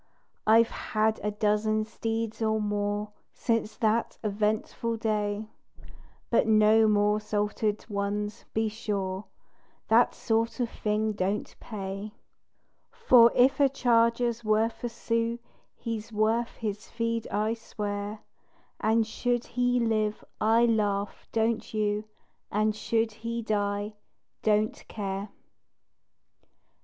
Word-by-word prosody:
I've 225 +1 +6
had 220 0 0
a 210 - +1
dozen 210 +1 +1
steeds 225 0 -3
or 220 0 +2
more, 205 0 -1 0.2
Since 230 -2 -1
that 225 +1 +1
eventful 215 +2 -1
day; 215 -1 -1 0.8
But 230 - +3
no 220 0 +5
more 210 0 +3
"salted" 210 0 -1
ones, 205 0 -3
be 220 0 +1
sure 200 -3 -3 0.6
That 230 +2 +5
sort 225 +2 0
of 240 -2 -1
thing 215 +1 0
don't 200 0 -2
pay, 200 0 -6 0.8
For 250 - +6
if 255 +3 +4
a 280 -1 +5
charger's 235 -2 +2
worth 215 +2 +1
a 240 - -1
sou, 230 0 -1 0.4
He's 225 -1 -5
worth 225 +2 +1
his 210 -2 -5
feed, 230 -1 -2
I 215 +2 0
swear: 210 -2 -5 0.6
And 220 +1 +2
should 240 +2 -1
he 245 0 +1
live, 215 -2 0 0.2
I 225 +2 +5
laugh, 205 -3 0
don't 225 0 0
you? 210 0 0 0.5
And 215 +1 +1
should 225 +1 0
he 230 +2 -4
die, 205 0 -1 0.5
don't 215 0 +1
care. 200 -1 -4
215 Hz, 115 wpm, -28 LUFS, 210-230 Hz, 0.8 s, I've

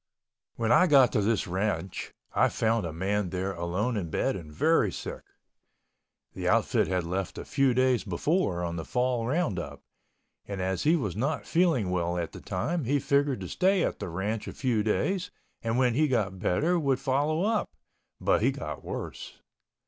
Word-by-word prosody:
When 115 -1 0
I 185 - +6
got 135 -6 +6
to 105 - +1
this 105 0 +1
ranch 95 0 -2 0.2
I - - +4
found 110 -4 0
a - - -5
man 95 +4 -1
there 95 +2 -2
alone 90 +8 -1
in 90 -6 -3
bed - - 0
and 80 -5 -8
very 110 - +2
sick. - - -6 1.1
The - - -4
outfit - - +2
had 90 -1 0
left 95 +2 -3
a - - -6
few 135 -3 +2
days 130 -1 +3
before 95 - 0
on 85 0 -3
the 80 - -3
fall 125 +2 0
roundup, 90 - -2 0.6
and 100 -2 -5
as 95 -1 -1
he 160 +3 +5
was 105 - -2
not 140 +7 -1
feeling 160 - +2
well 85 -1 0
at 85 -2 -3
the - - -10
time 150 - -2
he 140 +5 +2
figured 140 -4 +1
to 90 - -5
stay 190 - +2
at - - -2
the - - -4
ranch 100 +6 -3
a - - -5
few 120 -5 0
days 180 - 0 0.3
and 115 +1 -1
when 125 -2 +3
he 155 +5 +3
got 105 -8 0
better 150 - +1
would 140 -4 +1
follow 145 +5 +1
up, 220 +1 +1 0.5
but - - +2
he - - +4
got - - -5
worse. - - -6
110 Hz, 185 wpm, -28 LUFS, 95-140 Hz, 1.1 s, I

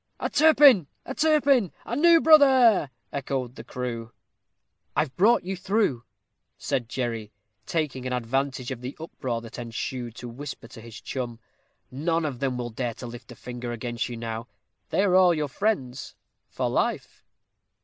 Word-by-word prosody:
"A - - -2
Turpin! 285 - +6 0.2
a 265 - -5
Turpin! 280 - +3
a 235 - -3
new 335 +4 +6
brother!" 265 - +6 0.2
echoed 130 -3 -3
the 115 - -10
crew. 120 -2 -5 0.8
"I've 140 -4 0
brought 225 +6 +4
you 190 +2 -3
through," 190 - 0 0.5
said 120 -3 -2
Jerry, 115 -5 -3 0.4
taking 145 -6 -2
advantage 130 +1 -1
of 125 -2 -5
the 125 +2 -7
uproar 130 -7 -4
that 115 +1 -9
ensued 120 0 -5
to 125 - -8
whisper 130 0 -8
to 115 - -11
his 115 -1 -10
chum; 120 -3 -5 0.5
"none 165 +5 0
of 135 -5 -4
them 130 -2 -1
will 120 -1 -4
dare 120 0 -3
to - - -8
lift 120 0 -10
a - - -10
finger 120 +1 -6
against 120 +1 -3
you 120 - -6
now. 115 0 -5 0.4
They 195 - +2
are 195 -3 +2
all 180 -2 +6
your 150 -1 -1
friends 135 - -2 0.3
for - - -2
life." - - -2
130 Hz, 160 wpm, -26 LUFS, 120-185 Hz, 0.8 s, Turpin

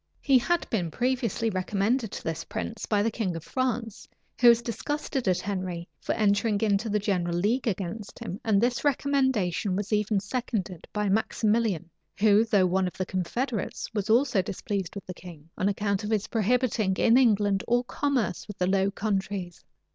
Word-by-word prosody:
He 270 -3 +4
had 345 +7 0
been 180 -7 0
previously 240 0 0
recommended 200 +5 0
to - - -6
this 165 0 -3
prince 85 -1 -5
by 205 -2 +2
the 225 - +1
king 200 -6 -2
of 165 - -6
France, 240 -3 -2 0.3
who 240 - +8
was 235 0 +5
disgusted 270 +1 -3
at 180 -1 +2
Henry 185 -4 -4
for - - -2
entering 205 0 +2
into 215 0 +1
the 210 - +2
general 180 -4 0
league 225 +8 +1
against 200 0 -4
him; 190 - -6
and 210 -3 +3
this 240 +2 +1
recommendation 260 -10 +1
was 205 +2 -2
even 210 -1 +2
seconded 205 -5 -4
by 210 -1 -1
Maximilian, 215 -2 +1 0.3
who, 210 +1 +5
though 205 -4 +3
one 185 +1 +1
of 180 - -7
the 185 - -1
confederates, 215 +6 -3
was 210 -1 -2
also 235 -3 +4
displeased 195 0 -4
with 200 - -7
the 185 - -6
king, 165 -3 -13
on 195 - +1
account 200 0 -1
of 210 - -3
his 215 -2 +1
prohibiting 225 -3 +1
in 230 - +4
England 205 -6 +3
all 240 +1 +2
commerce 245 -10 -1
with 205 -2 -8
the 180 - +1
Low 195 +1 +2
Countries. 195 -3 -3
205 Hz, 180 wpm, -27 LUFS, 190-235 Hz, 0.3 s, who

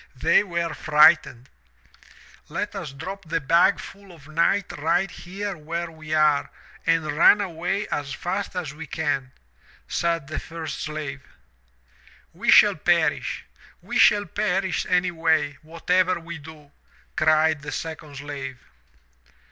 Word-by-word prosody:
They 125 - +4
were 170 -4 -2
frightened. 150 -5 +4 1.0
Tet - - -4
us - - -5
drop 185 +8 -8
the 165 +1 -1
bag 170 +6 +3
full 200 -1 -11
of 155 -5 -16
night 170 +5 +1
right 165 +5 +1
here 195 +3 -6
where 165 +2 -5
we 155 -1 -11
are 150 -2 +3 0.4
and 160 -2 +1
run 205 +6 +6
away 190 +2 -2
as 145 -1 -3
fast 185 +6 -4
as 170 -6 -4
we 160 +1 -9
can,' 140 -5 -2 0.6
said 170 -3 -1
the 155 +3 -4
first 165 -1 -7
slave. 150 -3 -5 1.1
*We - - -3
shall - - +7
perish. - - +1 0.3
We - - -3
shall 205 0 +5
perish, 195 -4 -1
anyway, 160 -5 +1
whatever 180 +3 0
we 170 -1 -8
do,' 150 -1 -14 0.4
cried 155 -1 +3
the 150 +1 -6
second 155 -3 -6
slave. 140 -2 -6
160 Hz, 130 wpm, -24 LUFS, 150-180 Hz, 1.1 s, shall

